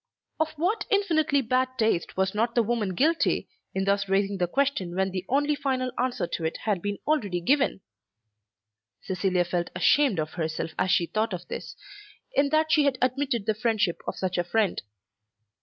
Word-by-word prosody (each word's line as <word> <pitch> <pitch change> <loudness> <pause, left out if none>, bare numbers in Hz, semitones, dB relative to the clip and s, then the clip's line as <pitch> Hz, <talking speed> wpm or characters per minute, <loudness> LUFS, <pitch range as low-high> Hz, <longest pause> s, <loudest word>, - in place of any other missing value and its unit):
Of 315 0 0
what 375 +8 -1
infinitely 320 - +2
bad 255 +2 0
taste 220 -8 0
was 190 0 +1
not 230 +3 0
the 235 - +4
woman 215 -4 -1
guilty, 320 - +2 0.3
in 190 0 0
thus 200 0 +1
raising 195 0 +1
the 175 - +1
question 200 -7 0
when 190 0 0
the 185 -1 -3
only 290 +3 +2
final 260 -3 -1
answer 250 -5 -1
to 170 -1 -4
it 160 - -1
had 205 -5 0
been 205 +1 -2
already 210 -13 0
given? 270 +3 +1 1.2
Cecilia 185 -1 0
felt 175 0 -2
ashamed 255 +4 +3
of 155 0 -2
herself 160 -1 -3
as 185 - +1
she 175 -2 +3
thought 215 +3 -1
of 175 0 -6
this, - - -6 0.6
in 280 0 +3
that 310 +1 +2
she 300 -2 +4
had 275 -2 +2
admitted 255 -3 0
the 220 - +2
friendship 215 -5 0
of - - -2
such 185 -1 -1
a - - +2
friend. 205 +2 0
220 Hz, 180 wpm, -26 LUFS, 185-280 Hz, 1.2 s, the